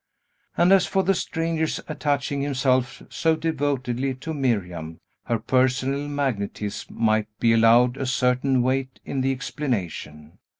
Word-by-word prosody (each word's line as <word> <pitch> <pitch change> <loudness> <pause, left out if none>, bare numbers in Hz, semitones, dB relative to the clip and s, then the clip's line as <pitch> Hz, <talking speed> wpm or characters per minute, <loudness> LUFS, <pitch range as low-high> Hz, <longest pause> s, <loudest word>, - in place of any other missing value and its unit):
And, 175 +2 +4
as 195 -2 +4
for 190 -1 +1
the 195 +1 +3
stranger's 165 -3 -1
attaching 145 -2 -1
himself 130 -2 0
so 160 -1 +1
devotedly 135 -5 -1
to 160 +5 -6
Miriam, 90 - -2 0.3
her 115 - 0
personal 130 +4 +1
magnetism 115 -8 -3
might 110 -2 +2
be 115 -1 +4
allowed 120 +3 +5
a 135 - -3
certain 125 0 +2
weight 130 0 -1
in 135 - -2
the 135 +1 +1
explanation. 90 - -4
130 Hz, 130 wpm, -24 LUFS, 115-145 Hz, 0.3 s, allowed